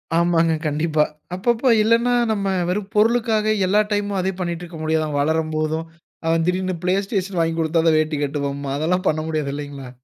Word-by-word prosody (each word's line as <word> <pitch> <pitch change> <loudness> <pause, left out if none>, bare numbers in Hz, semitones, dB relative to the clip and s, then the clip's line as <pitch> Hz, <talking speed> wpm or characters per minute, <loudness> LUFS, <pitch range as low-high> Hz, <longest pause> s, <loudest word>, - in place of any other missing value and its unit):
ஆமாங்க. 165 -1 +3
கண்டிப்பா. 155 +1 +1 0.3
அப்பப்போ 235 +6 +1
இல்லன்னா 230 +2 +3 0.2
நம்ம 200 -2 -1 0.2
வெறும் 195 +2 -2
பொருளுக்காக, 220 0 +2 0.2
எல்லா 205 +3 +3
டைமும் 205 -1 0
அதே 190 +1 0
பண்ணிட்டிருக்க 175 -1 -4
முடியாது, 155 0 +1
அவன் 145 -1 -2
வளரும்போதும், 155 +1 -1 0.4
அவன் 165 0 +2
திடீர்னு 185 0 0
ப்ளேஸ்டேஷன் 195 0 -1
வாங்கி 165 0 0
குடுத்தாதான் 160 0 +2
வேட்டி 155 -1 -1
கட்டுவேம்பான். 140 -1 -3
அதெல்லாம் 180 +5 0
பண்ண 155 0 0
முடியாது, 155 -3 -1
இல்லைங்களா? 145 -3 -7
165 Hz, 150 wpm, -21 LUFS, 155-195 Hz, 0.4 s, ஆமாங்க